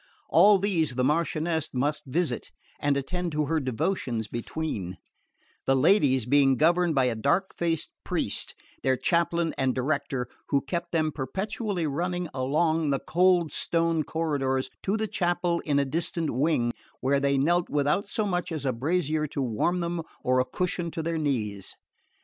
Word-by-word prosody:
All 200 +5 +7
these 175 -8 +1
the 125 - +1
Marchioness 160 +2 0
must 145 +3 -1
visit, 165 +5 -1 0.3
and 145 -1 +1
attend 175 +5 -3
to 150 0 +1
her 160 +2 +1
devotions 130 - -2
between; 115 - -4 0.7
the 135 - +4
ladies 135 - +4
being 135 0 +4
governed 170 +1 +3
by 135 -2 +4
a 125 - +1
dark 140 - 0
faced 165 -2 -1
priest, - - -1 0.3
their 130 -1 +2
chaplain 170 0 +1
and 130 -1 +1
director, 135 -2 -1 0.2
who 140 -2 +2
kept 170 +4 -4
them 155 -2 +1
perpetually 190 - -3
running 175 +4 -2
along 155 +4 +1
the 140 - +2
cold 175 -2 +3
stone 165 +1 +1
corridors 140 -5 -1
to 200 +3 0
the 220 0 -1
chapel 175 -2 0
in 145 -2 +1
a 140 - +3
distant 165 +2 0
wing, 125 -3 +1 0.3
where 140 +2 +2
they 140 0 +2
knelt 175 +5 +2
without 150 +7 +1
so 215 +1 -1
much 180 -3 -1
as 155 -4 -4
a 130 - +1
brazier 155 +3 0
to 145 - -6
warm 130 +10 0
them 170 0 -2 0.2
or 130 0 +3
a 130 - +2
cushion 175 +5 -2
to 165 0 -4
their 165 0 -1
knees. 110 -10 -2
155 Hz, 160 wpm, -27 LUFS, 135-175 Hz, 0.7 s, All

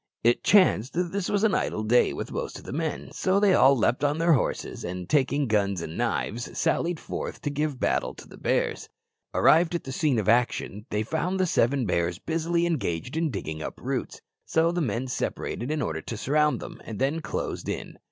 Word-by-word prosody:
It 120 +1 +3
chanced 180 - +4
that 175 0 -1
this 200 -1 -2
was 205 0 +1
an 215 -3 +3
idle 110 - 0
day 120 +3 +4
with - - -5
most - - -4
of - - -13
the - - -6
men, 160 0 -3
so 190 +1 +1
they 200 -2 +4
all 135 -5 +6
leaped 125 +3 +1
on 145 +1 +2
their 165 +1 +4
horses, 130 - -1
and 90 0 -5
taking 140 +2 +2
guns 100 -5 +1
and 80 0 -6
knives 120 +2 -2
sallied 170 -1 +1
forth - - -5
to 145 - -1
give 145 -2 -2
battle - - 0
to - - -12
the - - -13
bears. - - -1 0.5
Arrived 165 +2 +5
at 170 - -2
the 135 - -6
scene 140 -2 +1
of 105 -4 -1
action, 115 -3 +1
they 105 +1 0
found 180 - -1
the 185 - +3
seven 135 -5 +2
bears 85 -2 0
busily 165 - 0
engaged 130 - -2
in 160 0 +1
digging 80 - -5
up - - -6
roots, - - -3 0.2
so 165 +1 +2
the 175 0 -1
men 120 -2 -1
separated 125 0 -3
in 155 -2 -1
order 80 -6 -3
to 115 - -6
surround 150 +5 +2
them, - - -9
and 110 - -7
then 140 +7 0
closed - - -4
in. - - -5
140 Hz, 210 wpm, -26 LUFS, 110-165 Hz, 0.5 s, all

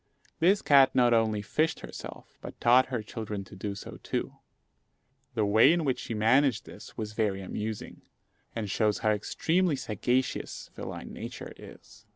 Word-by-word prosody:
This 190 +5 +4
cat 135 -3 +6
not 120 -2 +5
only 110 -2 +2
fished 155 +10 0
herself, - - -10
but - - -9
taught 125 +2 +5
her 125 -4 -3
children 105 -2 -5
to 95 - -13
do 100 +1 -4
so - - -9
too. - - -3 1.0
The 110 -2 +2
way 110 +7 +6
in 170 -2 +1
which 130 -3 0
she 115 - -5
managed 125 +3 +3
this - - -12
was 105 -1 -4
very 105 -3 0
amusing, 105 +3 -5 0.5
and 110 -2 -2
shows 105 +1 +1
how 110 - +5
extremely 165 - +1
sagacious 125 +1 -2
feline - - -7
nature - - -7
is. - - -15
115 Hz, 160 wpm, -29 LUFS, 105-130 Hz, 1.0 s, cat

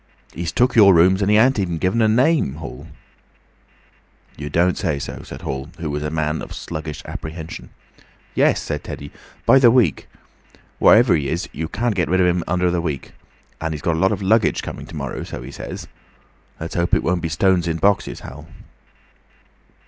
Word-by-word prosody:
He's 85 -1 -4
took 125 +1 +2
your 100 -5 +7
rooms 95 +4 +4
and 100 - +1
he 105 - +5
ain't 130 +2 +4
even 85 -4 -1
given 95 +7 +1
a 110 - +4
name, 125 - +2
Hall." 75 0 -9 1.5
"You 75 0 -6
don't 85 +4 +2
say 75 - -1
so!" 70 - -6
said - - -10
Hall, 65 +2 -4
who 80 -3 -4
was 75 +1 -3
a 75 - -2
man 75 0 -1
of - - -8
sluggish 80 -1 -6
apprehension. 80 +1 -7 0.6
"Yes," - - +3
said - - -4
Teddy. 70 0 -8 0.3
"By 135 - +6
the 125 -3 +7
week. 120 -1 +2 0.7
Whatever 115 -4 +6
he 70 -3 -1
is, 85 +4 -2
you 80 +1 -4
can't 115 +6 -1
get 90 -6 -1
rid 95 +1 +2
of 90 - +4
him 90 -1 +1
under 90 +1 +1
the 85 -1 0
week. 75 -6 -4 0.5
And 80 -1 -2
he's 75 - -8
got 85 -3 +1
a - - -2
lot 95 +2 +3
of 100 -1 -2
luggage 110 +3 +2
coming - - -7
to - - -10
morrow, - - -4
so - - -7
he - - -9
says. - - -7 0.7
Let's 80 +1 -6
hope 85 0 +1
it - - 0
won't 90 0 0
be 80 - -2
stones 90 +2 +2
in 80 -1 -1
boxes, 100 +4 +1
Hall." 75 +5 -10
85 Hz, 195 wpm, -21 LUFS, 80-100 Hz, 1.5 s, your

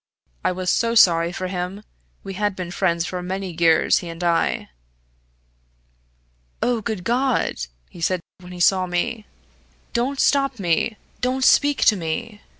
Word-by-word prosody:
I - - +2
was 180 0 -1
so 230 0 +1
sorry 170 -5 +5
for 185 +1 -4
him. 185 +2 -4 0.4
We 195 - -6
had 205 +1 -1
been 180 -2 -5
friends 170 -2 0
for 180 0 -4
many 185 -1 -4
years, 165 -2 +4
he 175 - -7
and 165 +1 -7
I. 170 -1 +1 1.9
'Oh, 240 -2 +1
good 215 -4 -4
God!' 250 +3 +1 0.3
he 170 - -13
said, 185 +2 +1 0.2
when 180 0 -12
he 180 - -8
saw 185 +1 +3
me. 180 +5 -2 0.7
'Don't 260 +4 -1
stop 275 -2 +2
me 195 +3 0 0.2
don't 255 +1 0
speak 290 +1 +4
to 215 - +6
me!' 185 +5 -4
185 Hz, 150 wpm, -22 LUFS, 175-230 Hz, 1.9 s, to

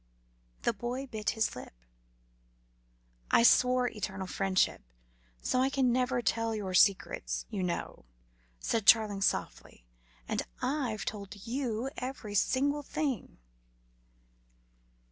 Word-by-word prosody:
The - - +2
boy 240 +5 -4
bit 215 -5 -3
his 220 -1 +1
lip. 125 - -10 1.5
"I - - +5
swore 250 +1 +5
eternal 195 -4 -4
friendship, 190 0 +1 0.6
so 255 - +1
I 265 - +3
can 265 -3 +2
never 250 0 +1
tell 230 0 0
your 195 -3 -4
secrets, 195 +1 +2
you 205 -3 -2
know," 170 - -3 0.5
said 225 - -1
Charling 215 -4 +5
softly, 125 - -2 0.4
"and - - -1 0.2
I've 255 -7 -2
told 200 -1 -6
you 245 0 -2
every 250 -5 -5
single 280 +8 +1
thing." 280 - -3
225 Hz, 110 wpm, -31 LUFS, 200-255 Hz, 1.5 s, I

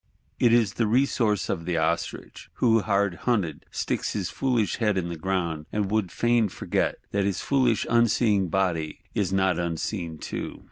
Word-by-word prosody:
It 120 -3 +4
is 115 -4 +3
the 115 - 0
resource 115 -3 +2
of 85 - -3
the 85 -1 -1
Ostrich; 85 +1 -2
who, 115 -2 +3
hard 100 -2 +1 0.2
hunted, 90 -11 -1
sticks - - -2
his - - -2
foolish 125 -6 0
head 105 -4 +1
in 85 -2 -1
the 85 - -4
ground, 85 -3 -2
and 105 -2 -1
would 105 -5 0
fain 120 -2 +2
forget - - -1 0.2
that 100 0 +1
his 100 -2 -1
foolish 130 -5 +2
unseeing 110 -4 +3
body 85 -4 -1
is 95 -2 0
not 95 -2 +2
unseen 85 0 -3
too. - - -6
100 Hz, 170 wpm, -26 LUFS, 85-115 Hz, 0.2 s, It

